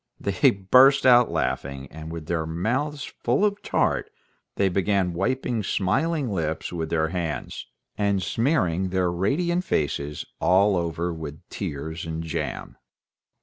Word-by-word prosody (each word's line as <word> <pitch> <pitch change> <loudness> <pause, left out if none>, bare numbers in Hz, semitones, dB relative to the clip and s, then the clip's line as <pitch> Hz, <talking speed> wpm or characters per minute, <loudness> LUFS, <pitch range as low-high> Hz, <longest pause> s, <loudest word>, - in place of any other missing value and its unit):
They - - +3
burst 130 +9 +5
out 125 -2 +7
laughing, 70 0 -2
and, 80 +1 -8
with 80 -2 -6
their 80 -1 -2
mouths 130 - -1
full 125 - 0
of 205 0 -1
tart, - - 0 0.5
they 100 - +2
began 95 -1 +1
wiping 120 +7 -1
their 110 - -1
smiling 135 - 0
lips 80 -3 -2
with 80 -2 -3
their 80 -1 +1
hands, 85 -4 -4 0.3
and 100 -1 +2
smearing 95 - +1
their 90 -1 +1
radiant 170 - 0
faces 75 - -2
all 100 +2 +4
over 85 0 -2
with 80 -2 -8
tears 80 +3 -5
and 80 0 -4
jam. 80 - -4
95 Hz, 140 wpm, -25 LUFS, 80-120 Hz, 0.5 s, out